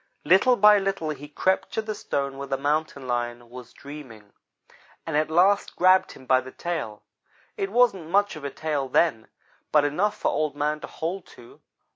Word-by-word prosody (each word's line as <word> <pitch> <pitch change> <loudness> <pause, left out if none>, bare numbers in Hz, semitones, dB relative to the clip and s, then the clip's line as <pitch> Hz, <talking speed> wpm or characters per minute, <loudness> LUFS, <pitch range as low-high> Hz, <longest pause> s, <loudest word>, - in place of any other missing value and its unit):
Little 200 +8 +5
by 210 -1 +6
little 195 -5 -2
he 145 0 -8
crept 190 +6 0
to 220 - 0
the 215 0 -4
stone 140 -8 -3
where 140 - -5
the 135 0 -1
Mountain 145 -1 -2
lion 120 -1 -3
was 125 -1 -11
dreaming, 130 -8 -12 0.7
and 160 - -3
at 155 +1 +1
last 190 +5 +3
grabbed 185 +1 +4
him 130 - -15
by 130 0 +3
the 130 - -10
tail. 145 -10 -5 0.5
It 195 - -2
wasn't 210 -8 +2
much 205 +1 +2
of 155 - -10
a 140 - -3
tail 145 -2 -3
then, 125 -6 +1 0.4
but 150 -1 +4
enough 180 +9 0
for - - 0
Old 155 -1 -1
man 150 +1 -1
to - - -8
hold 175 +3 -5
to. 120 - -16
150 Hz, 185 wpm, -25 LUFS, 135-190 Hz, 0.7 s, by